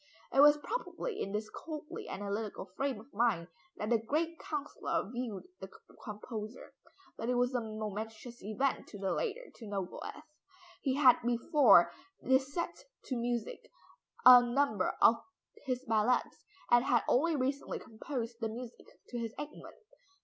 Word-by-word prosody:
It 270 - +3
was 295 +1 +8
probably 460 +5 -4
in 195 - -3
this 210 +1 -2
coldly 305 -2 -7
analytical 205 +1 -4
frame 270 -5 -1
of 235 +6 -16
mind, 200 -7 +1 0.3
that 210 +2 -3
the 235 - +4
great 315 +8 -1
councillor 290 -8 -3
viewed 240 -5 -4 0.2
the - - -8 0.3
composer. 215 +1 -7 0.5
But 230 - -2
it 250 - +2
was 245 +1 +2
a 245 - +1
momentous 220 +2 -6
event 235 +7 -1
to 205 - -9
the 195 -1 -1
latter 485 +2 -3
to 225 - -9
know 200 -2 -2
Goethe. 300 - -8 0.6
He 265 -2 0
had 265 -4 +6
before 245 +6 +5 0.3
this 265 +1 +2
set 340 +3 -4 0.2
to 260 - -3
music 235 -1 -3 0.6
a 250 -1 +11
number 240 -5 +1
of 230 - +7 0.5
his 255 0 -2
ballads 225 +2 +1 0.3
and 240 0 +6
had 240 - +3
only 325 +5 +3
recently 275 +1 -1
composed 230 +1 -5
the 225 -2 -1
music 240 +2 -8 0.2
to 240 - -4
his 230 -1 -4
Egmont. 295 +1 -8
240 Hz, 150 wpm, -33 LUFS, 220-275 Hz, 0.6 s, a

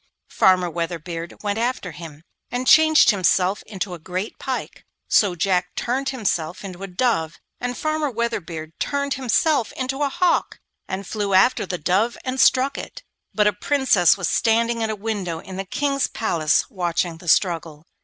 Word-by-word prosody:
Farmer 185 -1 +4
Weatherbeard 170 +1 -5
went 205 +1 -1
after 235 -6 -2
him, 155 -1 -11 0.3
and 245 +1 -3
changed 315 0 +6
himself 190 0 +1
into 190 -2 -4
a 175 - -7
great 185 +5 -5
pike. 260 -1 -5 0.2
So 200 -4 +3
Jack 180 +1 0
turned 265 +3 -1
himself 190 -9 -2
into 185 -1 -8
a 195 - -5
dove, 180 -5 0 0.2
and 245 0 -3
Farmer 310 -1 -1
Weatherbeard 180 -10 -4
turned 280 -1 -1
himself 265 0 +1
into 265 +2 -3
a 285 - +2
hawk, 355 +5 +1 0.3
and 190 +1 -4
flew 200 -1 -1
after 245 +7 +4
the 180 - -3
dove 190 +9 +1
and 260 0 -3
struck 270 +3 +3
it. - - -9 0.3
But 210 - +3
a 210 - +3
Princess 210 - +3
was 180 -4 -2
standing 230 +3 +1
at 220 - 0
a 215 - -2
window 200 -5 -3
in 185 +3 -9
the 195 - -4
King's 275 +6 0
palace 165 -8 +1
watching 175 -3 -1
the 175 - -13
struggle. 165 -1 +1
200 Hz, 165 wpm, -22 LUFS, 175-250 Hz, 0.3 s, changed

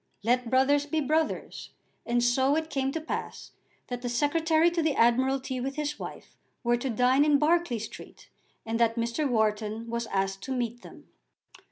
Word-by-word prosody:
Let 245 +1 +1
brothers 280 +3 +3
be 315 +1 0
brothers. 310 +2 -1 0.4
And 240 0 +1
so 260 +4 +3
it 320 0 -2
came 270 -1 0
to 325 - -2
pass 315 - -6 0.3
that 245 -1 -5
the 245 - -3
Secretary 315 +6 +2
to 340 -1 0
the 310 -3 +1
Admiralty 260 +2 +2
with 270 +2 -3
his 300 0 -3
wife - - -9 0.3
were 240 0 +2
to 260 +2 -3
dine 250 +4 +3
in 295 -1 +4
Berkeley 310 -3 +2
Street, 220 0 -10 0.4
and 225 +1 -2
that 230 -1 +3
Mr. 235 +5 -1
Wharton 220 -1 0
was 235 0 -2
asked 195 0 -1
to 265 - -5
meet 240 -1 -3
them. - - -14
260 Hz, 175 wpm, -28 LUFS, 235-295 Hz, 0.4 s, in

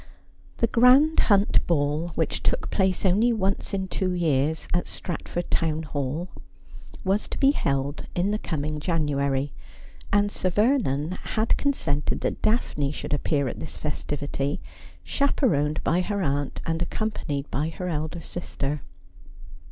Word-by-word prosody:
The - - +3
grand 255 +7 +6
Hunt 200 0 +4
Ball, 150 0 +1
which - - 0
took - - 0
place 190 -1 +1
only 210 +6 +4
once 200 -3 0
in 190 -2 -1
two 185 0 -1
years 160 -3 +1
at 175 - +1
Stratford 175 0 -4
Town 160 -1 +1
Hall, 145 +3 -3 0.8
was 195 +2 +1
to - - -5
be 275 0 +5
held 140 - -1
in 185 +3 +1
the 210 - 0
coming 150 -4 -3
January, 145 -4 0 0.6
and 205 0 +3
Sir 185 - -1
Vernon 180 - +2 0.2
had 220 +1 +3
consented 155 - 0
that - - -2
Daphne 150 - +1
should 150 - -4
appear 145 -1 +1
at - - -5
this 160 - -6
festivity, 145 -1 -2 0.4
chaperoned 160 - +1
by 175 +2 +2
her 200 +1 -1
aunt 140 -2 -1
and 165 0 0
accom 215 +5 -1
panied 140 -7 -3
by 150 +3 0
her 180 +3 -5
elder 160 0 -3
sister. 150 -4 -4
165 Hz, 145 wpm, -26 LUFS, 145-200 Hz, 0.8 s, grand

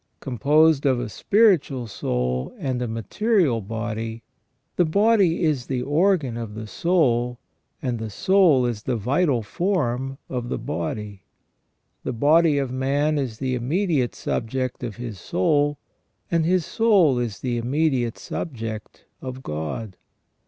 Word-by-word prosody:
Composed 145 +4 +3
of 130 -2 +2
a 120 - -4
spiritual 170 - +2
soul 65 - -2
and 130 -2 -2
a 125 - -1
material 135 - +1
body, 110 +2 -4 0.5
the 180 - +4
body 195 0 +3
is 145 -6 0
the 125 -2 -1
organ 150 -4 +2
of 115 -3 -6
the 110 0 -6
soul 125 -4 +1 0.5
and 125 -3 -1
the 110 0 -4
soul 165 - +4
is 120 -4 -2
the 125 +2 -1
vital 125 - +1
form 135 - -1
of 125 -2 -4
the - - -1
body. 100 +4 -4 0.8
The - - -3
body 150 +5 +4
of 135 -3 -1
man 140 +4 +1
is 125 -6 -3
the 130 0 -2
immediate 140 +1 0
subject 130 +2 -3
of 115 -4 -4
his 120 -5 -7
soul, 145 - +1 0.5
and 165 -2 +2
his 180 -2 +2
soul 195 - +3
is 115 -5 -3
the 120 -2 -1
immediate 130 -2 0
subject 115 -8 -6 0.2
of 130 0 -7
God. 80 - -5
130 Hz, 140 wpm, -23 LUFS, 115-155 Hz, 0.8 s, the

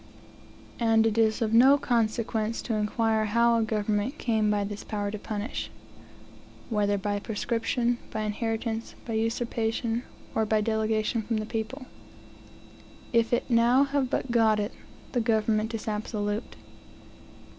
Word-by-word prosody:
And 225 -1 +4
it 220 -1 +1
is 220 +1 +3
of 220 0 -1
no 265 +5 +7
consequence 230 -3 0
to 230 - -2
inquire 220 +1 +1
how 235 +2 +3
a - - +2
government 215 +4 -1
came 220 -3 +1
by 205 -1 +1
this 205 0 -5
power 205 -2 -3
to 215 - -5
punish, 210 +3 -4 1.0
whether 205 -2 +2
by 205 +1 -1
prescription, 235 +3 -1
by 215 - -3
inheritance, 225 +1 -3
by 230 - -4
usurpation. 225 0 -1 0.3
or 220 - +1
by 215 0 +2
delegation 220 +1 0
from 225 +1 -2
the 215 - -2
people's 225 +5 -4 1.3
If 230 -1 +3
it 240 - +2
have - - -11
now 260 +4 +3
but 255 - -2
got 220 -2 +4
it, 210 +3 -2 0.4
the 245 - +1
government 220 -1 +1
is 225 - -6
absolute. 210 0 -3
225 Hz, 140 wpm, -27 LUFS, 215-235 Hz, 1.3 s, no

